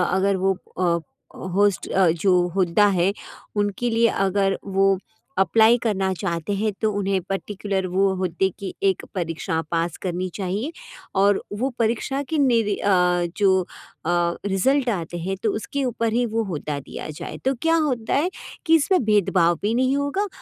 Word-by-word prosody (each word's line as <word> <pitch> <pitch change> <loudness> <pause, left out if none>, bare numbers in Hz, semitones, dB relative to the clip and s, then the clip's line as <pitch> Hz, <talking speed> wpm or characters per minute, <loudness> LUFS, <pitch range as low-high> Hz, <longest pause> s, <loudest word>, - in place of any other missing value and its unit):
अगर 195 +1 +2
वो 190 +1 +2 0.3
अ, 170 -2 +2 0.6
होस्ट 205 -1 +2 0.3
जो 195 - +3 0.2
हुद्दा 190 +2 +3
है, 185 +3 +2 0.4
उनके 205 +3 0
लिए 230 0 +3
अगर 195 -2 +1
वो 195 0 +2 0.4
अप्लाई 220 +5 +5
करना 195 -4 0
चाहते 170 -1 -3
हैं 215 +2 0
तो 220 -1 +2
उन्हें 195 -1 0
पर्टिकुलर 195 0 -2
वो 190 +2 +2
हुद्दे 185 0 0
की 195 -2 -5
एक 195 -2 +2
परीक्षा 165 -2 -2
पास 165 -1 0
करनी 180 0 -2
चाहिए 200 - -2 0.5
और 200 0 +4 0.2
वो 260 +3 +1
परीक्षा 235 +4 0
के 320 - 0
निर 240 -6 +3 0.2
अ, 180 -3 +3
जो 190 -2 +4 0.4
अ, 175 0 +1
रिजल्ट 250 +7 +2
आते 175 -5 -3
हैं 190 +3 -3
तो 220 - +2
उसके 275 +6 -3
ऊपर 230 -2 -1
ही 245 +1 +2
वो 225 - +2
हुद्दा 150 -2 -3
दिया 135 - -8
जाए। - - -6
तो 265 - +3
क्या 325 0 +3
होता 235 -5 -1
है 310 +6 +2 0.4
कि 325 -1 +5
इसमें 325 +1 +3
भेदभाव 185 -5 +3
भी 210 +2 0
नहीं 260 +2 +2
होगा 285 +9 -1
195 Hz, 160 wpm, -23 LUFS, 185-230 Hz, 0.6 s, अप्लाई